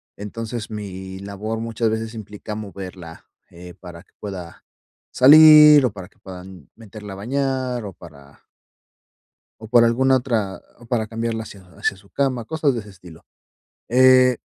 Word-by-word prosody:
Entonces 110 +2 -7
mi 95 -2 -8
labor 100 +3 -6
muchas 115 0 -2
veces 110 +1 -4
implica 105 -1 -8
moverla, 95 -5 -10 0.2
eh, 90 0 -13
para 90 -2 -12
que - - -37
pueda 90 -5 -9 0.5
salir, 150 +1 +8
o 120 - -1
para 95 -2 -10
que - - -31
puedan 90 -3 -12
meterla 105 -2 -11
a - - -9
bañar, 130 +1 -3
o 95 - -8
para 70 -5 -17 1.2
o - - -8
por 120 0 +4
alguna 130 +3 +2
otra 110 -7 -3 0.2
o 120 - -16
para 115 -2 -1
cambiarla 115 0 -4
hacia 100 -2 -13 0.2
hacia - - -1
su 100 +1 -21
cama, 130 -5 -2
cosas 155 -2 -1
de 115 - -3
ese 105 -1 -11
estilo. 90 -4 -16 0.6
Eh, 130 0 +5
110 Hz, 155 wpm, -21 LUFS, 95-125 Hz, 1.2 s, salir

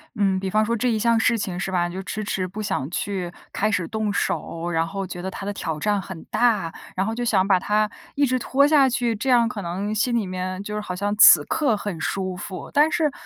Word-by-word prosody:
嗯， 195 -3 +1
比 190 - -3
方 215 +3 +2
说 235 +2 0
这 245 +2 0
一 225 - +1
项 230 +1 +2
事 230 +1 +2
情 185 -4 -3
是 190 0 -3
吧， 175 -1 +1
你 175 - -8
就 190 - -4
迟 215 +2 -5
迟 185 -2 -2
不 195 +4 -9
想 190 -9 -2
去 180 -1 -3 0.2
开 215 - +1
始 170 -4 0
动 220 -1 -2
手， 175 -3 -2
然 165 0 +1
后 195 +1 -4
觉 180 -1 -7
得 190 - -4
它 195 - -7
的 205 - -2
挑 160 -5 -4
战 205 +4 +1
很 185 -3 -9
大， 215 -9 +2 0.2
然 190 +1 0
后 220 - -2
就 240 +2 -3
想 195 -5 +2
把 190 -2 +4
它 210 +3 +1 0.3
一 285 - +3
直 255 -1 0
拖 275 +3 +3
下 290 -3 +5
去， 240 -2 0
这 230 +6 -3
样 240 -2 +5
可 220 -3 -5
能 190 +4 -3
心 225 +3 +1
里 225 -3 +1
面 185 0 -4
就 210 - -6
是 210 - -2
好 185 -3 -5
像 205 +2 -1
此 170 -7 +9
刻 265 -9 +1
很 200 -5 -5
舒 185 -1 -2
服。 185 +1 -7
但 300 +2 +4
是 310 -2 +1
205 Hz, 275 characters per minute, -23 LUFS, 185-230 Hz, 0.3 s, 此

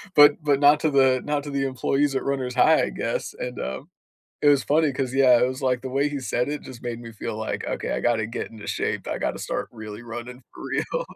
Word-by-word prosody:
but 145 +1 +7
but 145 -2 +2
not 145 +1 +6
to 155 - +1
the 130 -2 +4
not 150 -1 -1
to 145 - -6
the 140 -1 0
employees 135 +2 0
at - - 0
Runners 130 -2 -2
High, 125 - +5
I - - -1
guess, - - -3
and 125 -1 -5
um, 65 +1 -5 0.5
it 150 - +3
was 145 -2 +5
funny 155 0 +2
'cause 130 -1 -3
yeah, 130 -3 +6
it 125 - +4
was 130 +1 -5
like 125 -2 +1
the 130 - -5
way 140 +3 +1
he 145 - -4
said 125 0 -1
it 150 - -3
just 125 -2 -11
made 120 -1 -4
me 115 -1 -9
feel 110 0 -5
like, 110 - -3
"Okay, - - -3
I - - -1
gotta 115 -3 +1
get 115 - -5
into 110 -2 -10
shape, - - -2
I - - -2
gotta - - -2
start - - -3
really 110 -1 -8
running 120 +2 -8
for - - -10
real." - - -2
130 Hz, 255 wpm, -24 LUFS, 120-145 Hz, 0.5 s, but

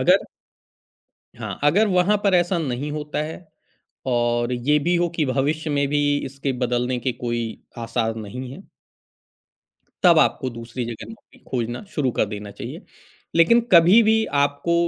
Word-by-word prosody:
अगर - - +4 1.1
हाँ, - - -5
अगर 195 +9 +4
वहाँ 185 +2 +3
पर 195 - +3
ऐसा 175 0 +2
नहीं 140 -2 -3
होता 150 -1 -4
है, 160 +3 -7 0.6
और 120 0 +1
ये 130 +5 +2
भी 175 +4 0
हो 175 0 +1
कि 155 - +2
भविष्य 145 +4 -1
में 140 -1 +1
भी 145 +1 +1 0.3
इसके 135 +1 -3
बदलने 125 0 0
के 125 +1 -1
कोई 120 0 -3 0.4
आसार 115 -1 -1
नहीं 120 +4 -7
है। 190 +8 -12 1.4
तब 170 -3 +7
आपको 130 -3 +2
दूसरी 115 +1 -5
जगह 115 -2 -7
नौकरी 225 -2 -16
खोजना 120 -1 -2
शुरू 135 -5 +1
कर - - +4
देना 105 0 -6
चाहिए। - - -7 0.6
लेकिन 235 +9 +6
कभी 180 +6 +7
भी 220 - +5 0.3
आपको 145 +4 0
140 Hz, 155 wpm, -22 LUFS, 120-170 Hz, 1.4 s, तब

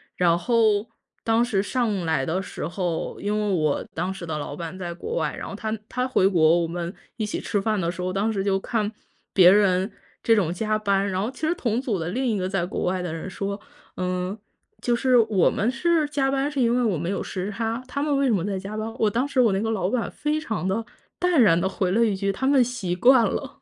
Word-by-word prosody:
然 170 -1 +3
后 220 +1 +2 0.3
当 225 +1 +3
时 205 -5 0
上 210 -6 -1
来 160 -5 +1
的 170 +6 -1
时 165 - -5
候， 175 -2 -3
因 205 +1 -1
为 210 -1 0
我 155 -3 +1
当 180 +3 -2
时 190 -2 -8
的 155 -1 -2
老 145 -1 -5
板 170 +2 -6
在 175 -2 -5
国 455 - -5
外， - - -1
然 - - -6
后 - - -6
他 220 -1 -3
他 250 0 -1
回 195 -7 +3
国， 165 -2 +4
我 165 - -1
们 170 +2 -4 0.2
一 215 - -1
起 210 - -3
吃 205 - -1
饭 215 -1 0
的 170 - 0
时 180 - -12
候， 185 0 -2
当 210 +3 0
时 195 -2 -1
就 195 -1 +1
看 215 0 -1 0.4
别 180 -2 +8
人 195 -1 +3 0.3
这 225 - +4
种 175 -5 +1
加 215 +3 0
班， 200 -1 +1
然 185 0 -1
后 220 - -1
其 310 +4 -3
实 340 - +2
同 235 -5 -1
组 225 -8 -1
的 165 - -3
另 260 +8 -1
一 220 -4 +1
个 185 - -1
在 195 -3 0
国 180 - -4
外 185 0 0
的 175 -3 -4
人 165 +3 -5
说：” 200 +2 -4 0.4
嗯， 185 +2 -2 0.4
就 240 -1 +1
是 255 0 +3
我 215 -6 +4
们 220 - 0
是 315 +2 +1
加 270 -2 +1
班 275 +1 0
是 285 - -3
因 235 0 +3
为 250 - +2
我 200 -8 +1
们 170 +4 -3
有 - - -2
时 190 +2 -4
差， 225 +3 -2
他 280 +2 -3
们 295 -1 +1
为 275 - +2
什 235 - +3
么 180 -4 +1
在 195 -2 -2
加 200 +2 -7
班？“， 220 +1 -4
我 215 - +3
当 245 +6 0
时 280 - -1
我 230 -4 +4
那 195 - +1
个 225 - -1
老 190 -4 0
板 240 0 -1
非 300 +1 -1
常 220 -9 -3
地 220 +4 -1 0.3
淡 355 -6 +3
然 170 -7 +5
地 190 - +1
回 185 -2 -1
了 230 +4 +3
一 210 - +1
句：” 195 +1 0
他 265 +6 -2
们 275 -2 +5
习 225 -8 -3
惯 245 +4 +6
了“， 275 +7 -4
205 Hz, 275 characters per minute, -24 LUFS, 185-235 Hz, 0.4 s, 别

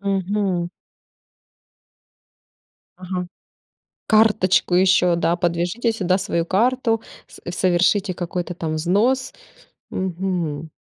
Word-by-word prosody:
Мгм. 195 -2 -1 2.3
Ага. 180 0 -4 0.8
Карточку 210 -5 +3
еще, 180 -1 +4
да, 170 0 +1
подвяжите 175 +7 0
сюда 185 -4 0
свою 170 -3 -1
карту, 225 +4 +1 0.3
с - - -15
совершите 185 +2 +2
какой-то 175 0 -4
там 160 -2 -3
взнос. 210 +11 +1 0.6
Мгм. 175 -4 -3
185 Hz, 85 wpm, -21 LUFS, 175-205 Hz, 2.3 s, еще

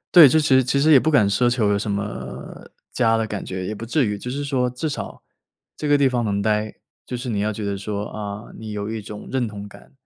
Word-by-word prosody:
对， 160 -6 +11
这 160 - +4
其 150 - 0
实 130 - +5
其 130 +3 +1
实 155 +3 +5
也 135 - +9
不 160 - +1
敢 105 -9 +4
奢 120 +5 +3
求 115 -4 +1
有 100 - +2
什 105 +1 -2
么 100 +1 -6 0.3
家 115 -2 +3
的 110 -1 -1
感 105 -2 -4
觉， 95 0 -4
也 110 - -3
不 115 - -7
至 135 +3 +1
于。 105 -1 -2
就 125 +5 -6
是 145 +2 -3
说 130 -3 0
至 125 +6 -4
少 150 - -6 0.5
这 150 - -3
个 145 - +5
地 140 -1 +4
方 125 -2 0
能 100 -2 0
待， 105 0 0 0.3
就 125 - -4
是 125 +2 -6
你 105 -3 -1
要 105 +1 0
觉 105 0 -5
得 100 -1 -2
说 100 +1 -4
啊， 105 0 -6
你 110 -1 -7
有 105 0 -4
一 110 -1 -4
种 105 0 -9
认 130 -2 0
同 105 -2 -7
感， - - -16
110 Hz, 285 characters per minute, -22 LUFS, 105-130 Hz, 0.5 s, 对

